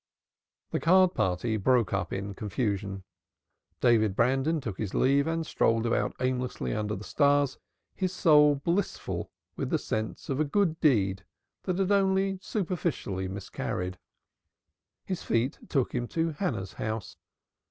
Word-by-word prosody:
The - - 0
card 185 +2 +5
party 95 +5 0
broke 115 0 +2
up 100 - -1
in 100 +1 -4
confusion. 100 -2 -2 0.8
David 110 -5 +4
Brandon 135 +8 +2
took 110 -8 -6
his 105 -4 -3
leave 140 +3 +3
and 165 0 -1
strolled 115 -5 +1
about 115 - 0
aimlessly 125 - -1
under 105 0 -2
the 100 - -7
stars, 145 +1 +2 0.3
his 185 -1 -1
soul 150 -5 +5
blissful 170 +8 -2 0.3
with - - -3
the - - +2
sense 110 0 -4
of 135 0 -2
a - - +4
good 165 +1 +1
deed 100 -9 +2 0.4
that 185 -2 -1
had 195 0 +1
only 195 -1 +2
superficially 165 - -2
miscarried. 95 -1 -4 1.1
His 185 -3 -3
feet 115 +4 0
took 135 -4 0
him 120 -1 -1
to 165 +3 -1
Hannah's 125 - -3
house. 110 -1 -4
130 Hz, 140 wpm, -28 LUFS, 105-165 Hz, 1.1 s, card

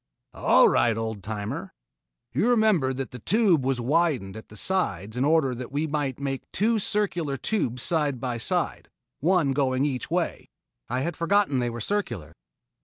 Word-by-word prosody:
"All - - +5
right, 115 -2 +3
old 110 -2 -3
timer. 105 +1 -5 0.6
You 235 - +2
remember 215 - +3
that 130 0 -4
the 125 - -8
Tube 195 - +3
was 130 -1 0
widened 135 - +1
at 110 - -10
the 105 - -13
sides 110 - -1
in 125 - 0
order 145 -3 +3
that 125 +1 -7
we 145 +3 0
could 145 -4 -2
make 135 -1 -4
two 220 +3 +2
circular 175 -9 -1
tubes 125 - -1
side 150 -7 0
by 120 -1 -3
side - - -1 0.3
one 165 -3 +2
going 135 -1 +1
each 130 -4 -2
way." - - -2 0.4
"I 125 +2 -1
had 170 +3 -2
forgotten 170 -4 +2
that 120 - 0
they - - 0
were 120 0 -6
circular." 120 - -3
135 Hz, 175 wpm, -26 LUFS, 120-170 Hz, 0.6 s, All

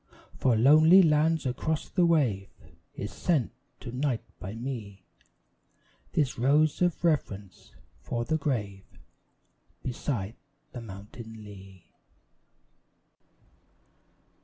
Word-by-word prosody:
From 115 -4 +2
lonely 160 +7 +8
lands 160 0 +3
across 150 +5 -2
the 180 -3 +2
wave 120 -13 +2 0.5
Is 105 - -5
sent 155 -9 0 0.3
to 120 - -6
night 125 -1 -1 0.2
by 95 +4 -6
me 115 -6 -6 1.1
This 140 -6 0
rose 145 +6 +3
of 175 -2 +1
reverence 105 - -2 0.3
for 120 0 -3
the 160 +5 +1
grave 105 -9 -2 1.0
Beside 120 -5 -3 0.4
the 125 - -7
mountain 110 +2 -10
lea. 95 -3 -13
125 Hz, 95 wpm, -28 LUFS, 105-150 Hz, 1.1 s, lonely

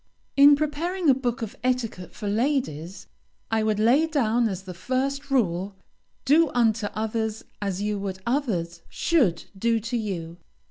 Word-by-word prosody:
In 285 +1 +8
preparing 310 +3 +1
a - - +6
book 250 -1 -2
of 215 - -6
etiquette 240 -8 -1
for 210 - -5
ladies, 200 - -1 0.5
I 225 -1 +2
would 215 -1 +1
lay 250 +9 +4
down 240 -6 +1
as 190 -1 -5
the 185 -1 -8
first 270 +9 -2
rule, 195 -7 0 0.5
"Do 310 +3 +5
unto 225 -3 +2
others 220 0 -2 0.2
as 200 -1 -2
you 210 -1 -1
would 195 -1 -4
others 195 - -1
should 255 - +1
do 230 +3 +1
to 235 +3 -3
you." 175 -7 -4
225 Hz, 150 wpm, -25 LUFS, 195-270 Hz, 0.5 s, In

